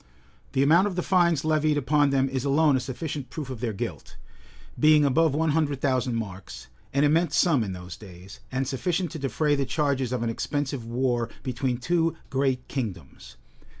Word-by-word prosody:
The 135 - +3
amount 170 +7 +5
of 195 - -4
the 180 - -1
fines 170 -5 +2
levied 155 -1 +2
upon 145 +1 +2
them 135 -1 +2
is 130 -1 -3
alone 145 +1 +3
a - - +2
sufficient 135 +1 -5
proof 145 -3 -6
of 125 - -6
their 120 -1 -2
guilt; 100 - -6 0.6
being 155 -1 +5
above 155 +2 +3
one 160 0 +1
hundred 145 -3 0
thousand 130 -3 0
marks, 95 - -6 0.3
an 140 +1 +2
immense 155 +1 +2
sum 145 -10 +3
in 95 -3 -4
those 90 -1 -8
days, 95 -1 -12
and 130 0 -1
sufficient 175 +6 -1
to 160 - -6
defray 140 +3 0
the 140 -1 +1
charges 135 -3 0
of 125 -2 -1
an 115 - 0
expensive 140 0 -3
war 120 -1 0
between 125 -1 -2
two 165 +5 0 0.2
great 130 -2 0
kingdoms. 90 - -6
135 Hz, 185 wpm, -26 LUFS, 125-155 Hz, 0.6 s, amount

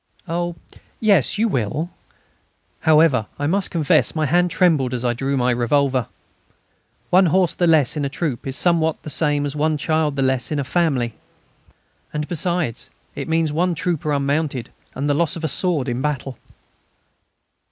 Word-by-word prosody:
"Oh! 175 0 -2 0.4
yes, 200 - +3
you 225 +2 +2
will." 150 - -2 0.9
However, 155 -8 +3
I 145 - -2
must 190 +5 +1
confess 160 -2 +2
my 155 -1 0
hand 175 +5 +2
trembled 155 -10 +2
as 125 0 -4
I 120 - +2
drew 135 +3 -2
my 125 0 +2
revolver. 130 +1 +1 1.0
One 185 +1 +5
horse 180 +1 +2
the 175 - +1
less 155 -5 +3
in 150 - -2
a 140 - -1
troop 140 -5 -3
is 135 - -2
somewhat 165 -3 +2
the 155 - -4
same 145 -1 +1
as 145 0 -4
one 155 +1 +1
child 155 -1 0
the 135 - 0
less 130 -2 0
in 150 - -1
a 140 - 0
family. 135 -6 0 1.0
And, 150 0 -3
besides, 175 -6 -1 0.2
it - - -6
means 160 -1 +1
one 175 +2 +1
trooper 160 -2 -2
unmounted 140 -3 -1 0.2
and 140 +3 -2
the 145 - +2
loss 160 +1 +1
of 165 - -7
a - - +1
sword 155 -2 0
in 120 0 -2
battle. 135 -2 -3
150 Hz, 170 wpm, -21 LUFS, 135-170 Hz, 1.0 s, One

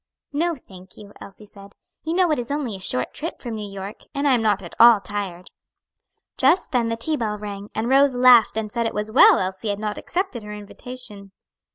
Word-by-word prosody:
"No 335 +3 0
thank 190 -7 -16
you," 205 -1 -13
Elsie 200 +2 -11
said; 200 -1 -15 0.3
"you 320 +2 -2
know 360 -3 +3
it 300 - +1
is 240 - -5
only 280 -7 -3
a - - -9
short 125 -9 -1
trip 330 +3 -5
from 240 -3 -6
New 210 -2 -6
York, 195 +1 -8 0.2
and 280 +1 0
I 275 - +4
am 240 - +2
not 205 -3 +1
at 170 - -10
all 235 -2 +8
tired." 195 -2 -6 0.9
Just 370 - +2
then 240 -4 +1
the 230 - -2
tea 305 +7 -1
bell 215 -4 -2
rang, 205 0 -7
and 220 +2 -1
Rose 270 0 +4
laughed 245 -3 +6
and 215 -1 -3
said 235 0 -1
it - - -6
was 210 +1 -2
well 245 - +7
Elsie 190 +3 -3
had 205 - -1
not 210 0 -4
accepted 365 - -3
her 210 0 -8
invitation. 210 -1 -9
220 Hz, 220 wpm, -22 LUFS, 200-255 Hz, 0.9 s, all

